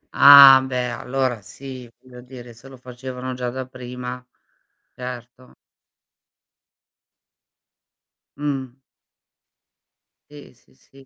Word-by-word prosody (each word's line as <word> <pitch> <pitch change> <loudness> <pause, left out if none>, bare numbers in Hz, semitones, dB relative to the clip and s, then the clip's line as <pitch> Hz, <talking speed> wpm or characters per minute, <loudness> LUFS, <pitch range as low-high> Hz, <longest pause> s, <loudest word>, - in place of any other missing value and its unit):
Ah, 140 -2 +9
beh, 125 -2 -4
allora 125 -1 -4
sì, 130 +3 -12
voglio 125 -1 -16
dire, 125 -2 -13
se 125 +4 -18
lo 135 -1 -14
facevano 125 +1 -9
già 125 -1 -5
da 130 +1 -7
prima. 125 0 -9 0.7
Certo. 125 0 -11 2.8
Mh. 135 -4 -5 1.6
Sì, 145 -3 -15
sì, 120 - -31
sì. 135 +1 -22
125 Hz, 90 wpm, -20 LUFS, 125-130 Hz, 2.8 s, Ah